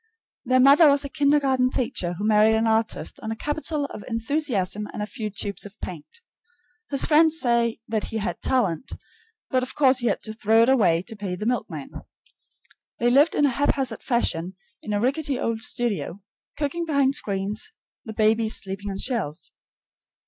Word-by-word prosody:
Their 255 +1 +3
mother 280 +4 +7
was 280 0 +2
a - - -5
kindergarten 275 -3 +2
teacher 205 -9 -2
who 200 +4 -4
married 215 +1 +4
an 220 +1 +1
artist 225 0 -1
on 220 - -6
a - - -2
capital 295 +3 -2
of 210 - -8
enthusiasm 225 -5 -2
and - - -7
a 210 - -1
few 215 0 -5
tubes 200 0 -5
of 205 0 -8
paint. 165 -5 -7 0.8
His 275 -2 +2
friends 320 +1 +4
say 235 -3 +1
that 220 -1 -1
he 225 - -4
had 200 -5 -3
talent, 245 -5 0 0.6
but 255 - +2
of 255 - -5
course 265 -3 +4
he 240 - -1
had - - -1
to 215 - -4
throw 220 +1 +3
it 235 - +3
away 180 -10 +3
to 225 +3 -9
pay 200 -3 -4
the 210 - -6
milkman. 190 - -3 1.1
They 240 +1 +2
lived 285 +6 +4
in 290 - +3
a - - +4
haphazard 275 0 0
fashion 185 -7 -1 0.3
in 215 - -6
a 205 - +1
rickety 275 +3 0
old 230 -2 -2
studio, 215 -5 -3 0.3
cooking 300 +3 -2
behind 280 -4 +2
screens, 205 - -3 0.3
the 220 - -7
babies 220 0 +2
sleeping 195 +1 -5
on 195 - -4
shelves. 190 - -3
230 Hz, 180 wpm, -24 LUFS, 205-270 Hz, 1.1 s, mother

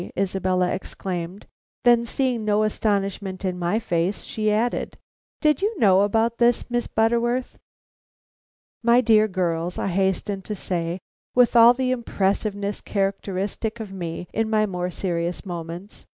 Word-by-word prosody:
Isabella 185 -1 0
exclaimed. 185 0 -5 0.4
Then 235 -1 +4
seeing 250 -3 0
no 210 0 +2
astonishment 200 -3 -1
in 180 -1 -2
my 175 +4 0
face, 180 -3 -1
she 215 -1 -1
added: 225 +3 -1 0.4
"Did 305 +3 +3
you 420 +1 0
know 195 -3 +5
about 225 +3 +1
this, 240 0 +2
Miss 240 0 0
Butterworth?" 235 +3 0 1.2
"My 235 +1 +5
dear 215 -2 +4
girls," 175 -2 -2
I - - -1
hastened 190 +1 0
to 210 - -4
say, 175 -2 -2 0.4
with 245 -1 +4
all 235 +1 +8
the 255 0 0
impressiveness 205 -3 -1
characteristic 200 +2 -2
of 210 -3 -7
me 175 -2 -5
in 225 0 0
my 215 -1 +3
more 180 -3 -3
serious 175 -1 -3
moments. 175 +2 -7
200 Hz, 135 wpm, -23 LUFS, 185-230 Hz, 1.2 s, all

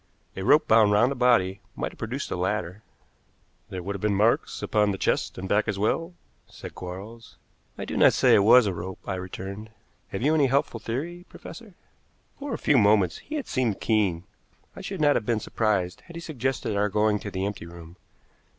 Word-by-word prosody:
A 95 - -5
rope 145 +10 +4
bound 110 -2 +5
round 115 +6 +4
the - - -2
body 115 -7 +2 0.2
might - - -3
have - - -19
produced 120 +5 -4
the - - -2
latter." 95 +1 -2 0.9
"There 90 -1 -6
would 100 +3 -3
have 100 - -7
been 105 -1 +1
marks 110 +4 +1
upon 105 -1 +2
the 100 - -2
chest - - -1
and 95 - -5
back 105 +2 +1
as 100 - -1
well," 165 - -1 0.3
said - - -10
Quarles. 100 +6 -9 0.4
"I - - -5
do - - -5
not - - +5
say - - +4
it - - +7
was 115 +4 +6
a 100 - -1
rope," 95 +2 -6
I 100 - -3
returned. 95 +3 -7 0.4
"Have 95 - -5
you 150 +3 +3
any 150 -4 +3
helpful 135 -3 0
theory, 165 +11 -5
professor?" 220 -6 -12 0.6
For 285 0 -5
a - - -2
few 140 -4 +3
moments 100 -4 +3
he 305 - -7
had 290 -5 -3
seemed 125 -6 -1
keen 100 -7 +1 0.5
I - - -8
should 195 -3 -5
not 145 -1 +4
have 110 - -1
been 115 -2 +1
surprised 100 -5 -1
had 170 - -12
he - - -5
suggested 135 -8 -3
our 105 +1 +1
going 105 +1 +1
to 105 - -6
the 95 -1 -3
empty 100 -4 -5
room. 85 0 -12
105 Hz, 205 wpm, -26 LUFS, 95-130 Hz, 0.9 s, it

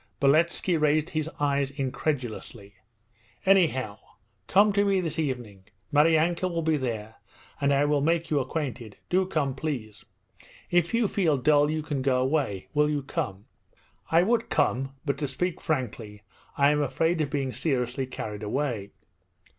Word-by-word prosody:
Beletski 160 +3 +2
raised 155 +1 +2
his 155 -1 -2
eyebrows 140 -1 +1
incredulously. 125 -6 -4 0.7
'Anyhow, 150 - +3 0.5
come 205 +1 +4
to 200 0 +3
me 200 -1 +2
this 165 -3 -3
evening; 120 -10 -4 0.3
Maryanka 165 +4 +3
will 170 -2 -2
be 160 0 +2
there 115 -5 -4 0.4
and 140 0 +3
I 140 +1 +3
will 145 -1 +2
make 165 +2 0
you 145 - +3
acquainted. 130 -5 -4
Do 185 +1 +2
come, 145 -7 0
please! 120 -8 -5 0.7
If 175 +3 +2
you 230 -2 +3
feel 170 -8 +1
dull 145 +2 +4
you 155 0 -2
can 145 -3 -3
go 130 -1 +2
away. 130 -8 0
Will 150 0 +3
you 145 -2 -1
come?' 95 -6 -4 0.6
'I 165 +2 +5
would 230 +3 +1
come, 135 -2 0
but 140 - -1
to 145 - -1
speak 170 +7 -2
frankly 115 -7 -3 0.3
I 140 0 +5
am 150 0 +1
afraid 160 +5 +1
of 145 - -1
being' 135 -2 -2
seriously 130 -3 -1
carried 110 -5 -6
away.' 110 -2 -2
145 Hz, 155 wpm, -27 LUFS, 130-160 Hz, 0.7 s, I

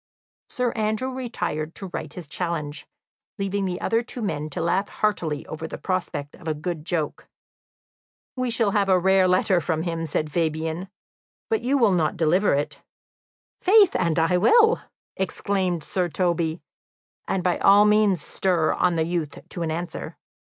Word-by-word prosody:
Sir 250 -1 0
Andrew 220 +4 -1
retired 175 -11 -3
to 195 -3 -8
write - - -5
his 175 -5 -7
challenge, 155 -3 -4 0.5
leaving 195 0 -1
the 180 -1 -3
other 225 +1 +1
two 240 0 -7
men 155 -6 -2
to 155 - -5
laugh 180 +4 0
heartily 165 -9 -1
over 155 +1 -6
the - - -7
prospect 170 -6 -3
of 170 - -12
a 155 - 0
good 160 0 -4
joke. 160 -4 -2 1.1
"We 255 -1 -1
shall 230 -3 +1
have 200 -1 +1
a 185 - +5
rare 190 +1 +4
letter 185 0 +3
from 160 -2 -1
him," 165 -1 -2
said 155 0 -2
Fabian, 160 +2 -1 0.6
"but 445 - +2
you 275 +3 +1
will 230 -6 +4
not 160 -4 +1
deliver 175 +3 +3
it?" 145 +1 -3 0.8
"Faith, 400 0 +5
and 170 -3 +1
I 165 +2 +3
will!" 450 - +5 0.4
exclaimed 185 -3 -1
Sir 180 -2 -1
Toby, 170 -2 -1 0.6
"and 185 - -1
by 180 -1 +1
all 200 +1 +6
means 210 -5 +3
stir 175 -4 +1
on 180 -1 +1
the 160 -1 +1
youth 165 -3 -3
to 175 - -5
an 165 - -1
answer. 170 +2 -5
180 Hz, 165 wpm, -24 LUFS, 160-200 Hz, 1.1 s, all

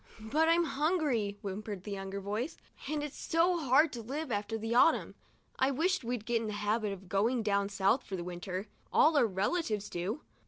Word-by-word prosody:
" - - -18
But 300 +9 +1
I'm 340 +1 +4
hungry," 285 - 0
whimpered 200 -1 -5
the 210 - -6
younger 195 0 -4
voice, 215 - -3 0.3
"and 300 -1 -1
it's 295 -1 -5
so 340 +2 +2
hard 295 +2 +4
to 235 - -5
live 270 +5 -4
after 210 +1 -1
the 225 +1 -3
autumn. 255 +7 +4 0.5
I 265 - +4
wish 320 +5 +1
we'd 235 -2 -3
get 235 -1 +1
in 225 - -3
the 210 - -3
habit 210 +1 0
of 195 -1 -8
going 220 +5 +1
down 200 -1 +1
South 200 +5 +2
for 195 - -5
the 175 - -4
winter. 180 +2 -5 0.3
All 315 +1 +5
our 260 -5 +5
relatives 210 - -1
do." 195 - -3
225 Hz, 200 wpm, -32 LUFS, 200-295 Hz, 0.5 s, All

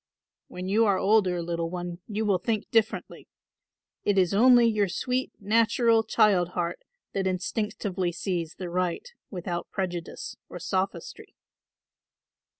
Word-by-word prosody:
"When 180 +1 -7
you 215 +4 +3
are 195 -2 +3
older, 190 -4 +2
little 170 0 -2
one, 175 0 -5
you 215 0 -2
will 195 -3 +2
think 215 +3 -2
differently. 225 -1 0 0.8
It 205 -1 +1
is 185 -1 +3
only 240 +3 +6
your 215 -3 +2
sweet 250 +7 -2
natural 225 +2 +3
child 200 -6 +3
heart 170 -1 -1 0.3
that 195 -1 0
instinctively 190 -1 -2
sees 170 -2 -3
the 180 -2 -5
right 180 - -1 0.2
without 175 -2 -4
prejudice 180 -4 -4
or - - -7
sophistry." 185 -1 -3
190 Hz, 130 wpm, -27 LUFS, 175-220 Hz, 0.8 s, only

